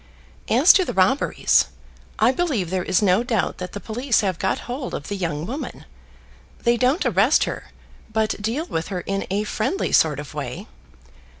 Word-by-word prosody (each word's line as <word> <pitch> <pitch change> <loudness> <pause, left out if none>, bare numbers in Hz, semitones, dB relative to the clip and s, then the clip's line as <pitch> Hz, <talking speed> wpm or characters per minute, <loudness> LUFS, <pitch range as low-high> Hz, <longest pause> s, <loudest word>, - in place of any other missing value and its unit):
As 265 +10 +7
to 380 - +4
the - - -5
robberies, 190 +9 +3 0.5
I 225 +3 +4
believe 260 - -1
there 185 -1 0
is 185 +3 +1
no 190 +2 +4
doubt 230 -5 -1
that 180 -1 -6
the 205 - -5
police 240 +4 0
have 190 -5 -2
got 190 - -1
hold 255 +2 -4
of 145 - -7
the 205 - -2
young 165 -5 -3
woman. 270 - -6 0.8
They 235 0 +3
don't 255 +6 +1
arrest 225 - +4
her, - - -4 0.5
but 220 -1 -1
deal 235 +10 -2
with 165 - -3
her 185 -3 -4
in 195 +2 -3
a 200 +2 0
friendly 215 - -2
sort 150 -3 +3
of 145 -2 -8
way. - - -5
215 Hz, 180 wpm, -22 LUFS, 185-250 Hz, 0.8 s, As